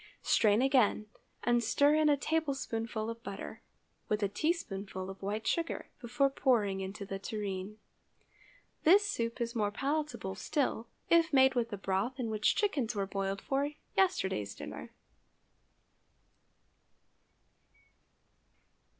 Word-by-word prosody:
Strain 215 +2 +4
again, 255 -6 +3 0.4
and 240 0 +2
stir 285 +6 +4
in 310 0 +4
a 290 - +4
tablespoonful 265 -8 -2
of 230 0 -6
butter, 200 -3 -7 0.5
with 210 0 0
a - - +3
teaspoonful 195 - -2
of 195 - -12
white 205 +3 -3
sugar, 335 -1 -1
before 245 +3 +1
pouring 210 -8 +1
into 195 +2 -5
the 195 0 -5
tureen. 200 -1 -4 1.1
This 395 +6 +6
soup 230 -11 -2
is 235 -1 -2
more 210 -3 +1
palatable 275 -4 -2
still 225 +4 -1 0.2
if 335 -1 +5
made 265 -1 +6
with 235 -2 0
the 205 - -5
broth 195 +7 -1
in 230 -3 -2
which 215 0 +2
chickens 275 - 0
were 200 -1 0
boiled 195 0 -3
for 280 +1 0 0.3
yesterday's 190 - +1
dinner. - - -8
230 Hz, 125 wpm, -32 LUFS, 200-280 Hz, 1.1 s, This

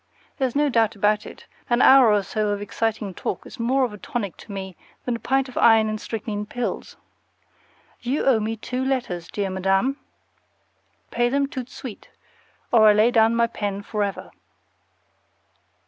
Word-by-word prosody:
There's 260 -2 -1
no 295 +1 +3
doubt 225 -5 +2
about 210 +1 +1
it, - - -12 0.2
an 240 0 +2
hour 260 -3 +7
or 205 -1 +2
so 215 +1 -1
of 205 0 -1
exciting 210 0 -2
talk 180 - -4
is - - -12
more 260 +4 +2
of 235 - -6
a 210 - -10
tonic 205 -5 -4
to - - -12
me 190 -2 -6 0.3
than 245 - -1
a - - -6
pint 270 +2 0
of 255 - -5
iron 225 -1 +5
and 215 0 -4
strychnine 210 -2 -4
pills. 245 +2 -4 1.0
You 260 +5 -1
owe 255 -5 +4
me 220 +1 -3
two 250 +4 -3
letters, 245 -11 -2
dear 200 -2 -3
Madam. 195 +9 +1 1.1
Pay 240 0 +1
them 280 +2 +1
TOUT 260 -3 -6
DE - - -21
SUITE, 250 -7 -9 0.6
or 220 -2 +6
I 210 - +7
lay 215 +3 +4
down 225 -1 +4
my 235 0 +3
pen 205 -3 -4
forever. 205 -2 -3
225 Hz, 175 wpm, -23 LUFS, 205-250 Hz, 1.1 s, hour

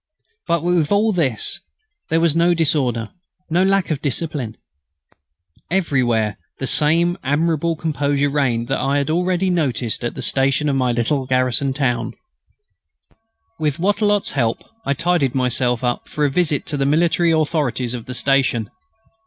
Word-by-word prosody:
But, 170 -1 +1
with 175 -3 +1
all 210 +2 +3
this, 135 - 0 0.5
there 165 - +2
was 165 -2 +2
no 170 +1 +3
disorder, 130 -8 0 0.4
no 175 +3 +3
lack 195 -2 +1
of 150 -2 -2
discipline. 140 -5 -2 1.1
Everywhere 125 - 0 0.2
the 135 - -4
same 170 +6 +2
admirable 160 +3 0
composure 145 -2 0
reigned 125 -5 0
that 135 - 0
I 140 +1 0
had 140 +1 0
already 180 +2 +1
noticed 130 -9 -1
at 120 - -3
the - - -4
station 135 +2 +2
of 140 - 0
my 130 -2 +1
little 130 +3 0
garrison 130 +1 +1
town. 125 -4 -1 1.5
With 150 -2 0
Wattrelot's 205 +2 +1
help, 120 -5 -1 0.2
I 140 - +1
tidied 165 -5 0
myself 125 -1 +1
up 120 -1 -2
for 150 - 0
a 140 - +1
visit 150 -2 0
to 145 - -2
the 135 - 0
military 170 +3 +2
authorities 150 -6 0
of 120 -2 -6
the 125 - -6
station. 130 -5 +1
145 Hz, 150 wpm, -20 LUFS, 125-165 Hz, 1.5 s, all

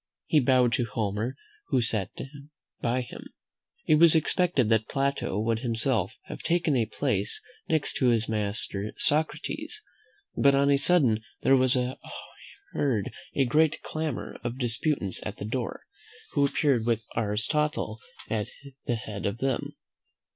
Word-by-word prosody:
He 155 - +4
bowed 125 -2 +4
to 120 - +1
Homer, 110 +2 -2 0.4
and 130 -3 +3
sat 110 -4 -1
down 140 +1 -9 0.3
by 120 +2 +1
him. 120 - -9 0.6
It 155 - +5
was 165 -1 +7
expected 160 - +2
that 110 -1 +2
Plato 140 -7 -1
would 110 +1 0
himself 115 -2 0
have - - -8
taken 170 -4 +1
a 115 -3 +2
place 100 0 -1 0.3
next 155 -2 +1
to 130 - +2
his 115 -2 +3
master 105 -1 -2
Socrates: 155 +2 0 0.5
but 140 0 +5
on 140 +1 +4
a 140 - +5
sudden 135 -9 +4 0.2
there 135 - +6
was 130 -1 +4 1.0
heard 115 -9 0 0.2
a 135 - +3
great 155 +5 +2
clamour 155 -4 -4
of 120 0 -3
disputants 120 - 0
at 105 - -5
the - - -5
door, 120 +2 -3 0.5
who 140 0 +3
appeared 135 -5 +2
with 115 -2 +1
Aristotle 115 +2 -1 0.3
at 110 -2 -2 0.4
the 120 - +2
head 105 -4 -4
of 100 +2 -2
them. 135 0 -2
125 Hz, 145 wpm, -27 LUFS, 110-140 Hz, 1.0 s, was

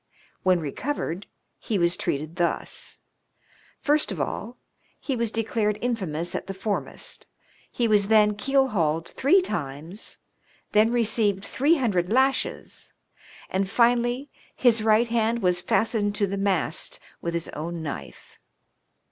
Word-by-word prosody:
When 185 -1 +3
recovered, 175 - -3 0.3
he 215 - -1
was 170 0 +3
treated 155 0 -3
thus: 175 -1 -2 0.8
First 295 -4 +2
of 185 - -4
all, 215 - -3 0.4
he 270 - -2
was 235 -1 0
declared 220 -1 0
infamous 185 -9 -2
at - - -4
the 195 - -5
foremast; 200 +1 -3 0.4
he 240 - +1
was 205 -2 +4
then 210 -1 +5
keel 270 +4 +2
hauled 165 -6 0
three 350 +9 +4
times; 160 - -5 0.5
then 215 +2 +4
received 220 -4 +1
three 295 +6 +3
hundred 200 -8 0
lashes; 265 +3 0 0.5
and 190 0 -1
finally, 240 +4 +2 0.2
his 235 -3 +4
right 220 +2 +4
hand 230 -1 +1
was 180 -1 +2
fastened 210 0 +1
to 205 - +2
the 200 0 -3
mast 195 -5 0 0.2
with 170 0 -2
his 170 - -2
own 165 +2 -5
knife. 145 - -8
210 Hz, 130 wpm, -25 LUFS, 175-235 Hz, 0.8 s, then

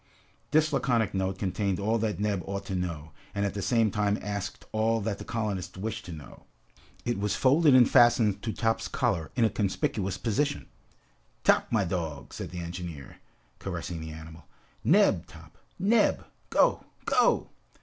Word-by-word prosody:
This 155 0 +3
laconic 115 -4 +1
note 95 0 -1
contained 95 0 -1
all 110 +3 +1
that 110 -2 -1
Neb 105 -3 0
ought 100 0 -4
to 95 - -5
know, 85 -4 -4 0.2
and 100 0 0
at 100 - -2
the 100 - -4
same 110 +2 +2
time 105 0 +1
asked 100 -2 -5
all 110 +1 +1
that 100 -1 -2
the - - -6
colonists 100 -5 -3
wished 110 +3 -4
to 90 - -8
know. 75 -3 -11 0.6
It 120 -4 -1
was 105 0 0
folded 140 +1 +5
and 125 -2 +7
fastened 120 -5 +4
to 110 - -2
Top's 115 0 0
collar 80 -2 -1
in 120 - +3
a - - +3
conspicuous 95 -1 -1
position. 130 +9 -1 0.8
"Top, - - +4
my 110 -4 +2
dog," 80 -6 -4
said - - -6
the 90 -1 -6
engineer, 85 -5 -7 0.4
caressing 85 -2 -5
the 80 - -6
animal, 80 0 -11 0.4
"Neb, - - +4
Top! - - -15 0.2
Neb! 215 +3 +3 0.2
Go, - - +3 0.2
go!" - - +2
100 Hz, 165 wpm, -28 LUFS, 90-115 Hz, 0.8 s, and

